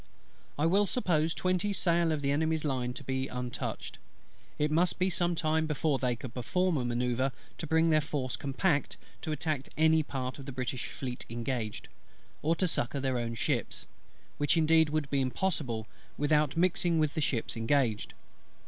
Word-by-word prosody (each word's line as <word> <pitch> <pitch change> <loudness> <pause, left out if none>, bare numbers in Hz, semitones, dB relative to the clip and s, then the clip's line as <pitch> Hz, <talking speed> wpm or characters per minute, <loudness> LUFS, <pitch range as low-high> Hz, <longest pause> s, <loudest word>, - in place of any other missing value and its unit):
I 150 - +2
will 195 +5 +4
suppose 165 -8 +1
twenty 185 +2 0
sail 170 -3 +2
of 150 -2 -1
the 140 - +2
Enemy's 160 +1 +1
line 130 -3 -1
to 140 - -8
be 130 0 -1
untouched: 125 -2 -5 0.6
it 150 0 +1
must 170 +3 +3
be 185 +1 +1
some 175 0 +1
time 160 0 +1
before 150 -2 +1
they 125 -2 +1
could 120 0 -8
perform 165 +8 0
a 130 - -1
manoeuvre 125 +2 0 0.3
to 165 - -4
bring 160 +1 +3
their 155 0 +4
force 140 -4 -2
compact 140 +2 0 0.2
to 155 - -3
attack 150 -2 -2
any 160 0 +5
part 130 -3 -4
of 135 - -9
the - - -4
British 125 -1 -3
Fleet 125 -2 -5
engaged, 115 -2 -3 0.5
or 160 +3 +2
to 185 - +1
succour 140 -3 0
their 130 -2 0
own 115 -1 -3
ships; - - -1 0.5
which 145 +3 +3
indeed 160 -1 +5
would 155 -1 0
be 140 -1 +2
impossible, 130 - -1 0.3
without 150 0 +2
mixing 175 -1 +3
with 155 -2 +2
the 160 - -1
ships 125 -5 0
engaged. 115 -1 +1
145 Hz, 175 wpm, -30 LUFS, 130-160 Hz, 0.6 s, any